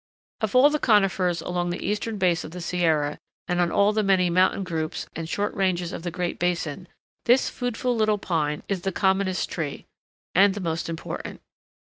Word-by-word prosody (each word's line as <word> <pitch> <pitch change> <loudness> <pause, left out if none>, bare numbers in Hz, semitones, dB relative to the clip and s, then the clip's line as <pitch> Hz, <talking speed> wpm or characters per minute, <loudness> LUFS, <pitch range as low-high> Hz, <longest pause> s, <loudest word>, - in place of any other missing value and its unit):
Of 220 0 -2
all 275 +4 +7
the 300 - 0
conifers 195 -6 +2
along 175 0 -2
the 175 - -4
eastern 210 +2 -2
base 180 -3 +2
of - - -7
the 180 +3 -8
Sierra, 160 -4 0 0.3
and 180 -1 +1
on 170 -1 +1
all 200 +1 +3
the 215 - +2
many 190 -3 +3
mountain 185 +2 +3
groups 160 -3 -3
and 165 0 -5
short 205 +3 -1
ranges 180 -3 0
of - - -5
the 175 - -3
Great 175 0 -3
Basin, 175 -1 -2 0.4
this 245 +3 +4
foodful 245 0 -2
little 215 -2 +2
pine 155 -6 -1
is 195 -3 -2
the 195 - -1
commonest 190 -1 +1
tree, 150 -5 -4 0.5
and 195 +1 +5
the - - -4
most 165 -2 -2
important. 165 -1 -6
180 Hz, 190 wpm, -25 LUFS, 170-205 Hz, 0.5 s, all